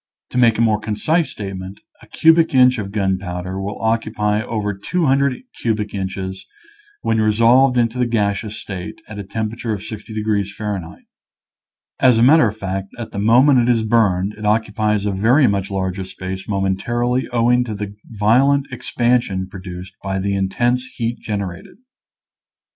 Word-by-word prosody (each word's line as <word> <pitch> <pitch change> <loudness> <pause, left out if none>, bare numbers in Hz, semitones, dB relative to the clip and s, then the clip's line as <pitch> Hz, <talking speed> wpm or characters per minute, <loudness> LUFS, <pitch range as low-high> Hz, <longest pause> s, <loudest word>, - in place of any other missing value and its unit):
To 125 - 0
make 115 -3 +4
a - - +1
more 110 -2 +3
concise 110 +11 0
statement, 95 -1 -7 0.2
a - - -16
cubic 160 -2 +3
inch 125 -1 +5
of 100 -2 -5
gunpowder 95 -2 -2
will 100 +1 -5
occupy 110 -2 0
over 105 -2 -2
200 140 - 0 0.2
cubic 105 -2 -1
inches 95 -1 -4 0.6
when 110 -1 +1
re 110 0 +3
solved 125 +4 +4
into 120 +1 +1
the 125 - +2
gaseous 105 -1 -1
state, 100 -1 -7
at 105 -1 -8
a - - -4
temperature 110 +3 -3
of 100 -1 -5
60 110 0 -8
degrees 105 -2 -1
F. 105 -3 -2 1.2
As 125 -3 +5
a 115 - +4
matter 145 0 +6
of 105 +1 -5
fact, 95 -1 -4
at 120 -2 -7
the 100 - -4
moment 125 +6 +5
it 120 0 +2
is 115 -2 +2
burned 105 -3 +2
it 110 - -11
occupies 105 -1 +1
a 100 - 0
very 115 +9 +3
much 100 -3 0
larger 95 -1 -2
space 95 0 -7
momentarily 120 +6 0
owing 120 +1 +3
to 110 -3 -5
the 100 0 -6
violent 125 +6 +2
expansion 120 -6 0
produced 90 -1 -9
by 95 -1 -2
the 100 +1 -1
intense 120 +6 0
heat 115 0 -2
gen 105 -2 -3
erated. 90 -2 -8
105 Hz, 165 wpm, -19 LUFS, 100-120 Hz, 1.2 s, matter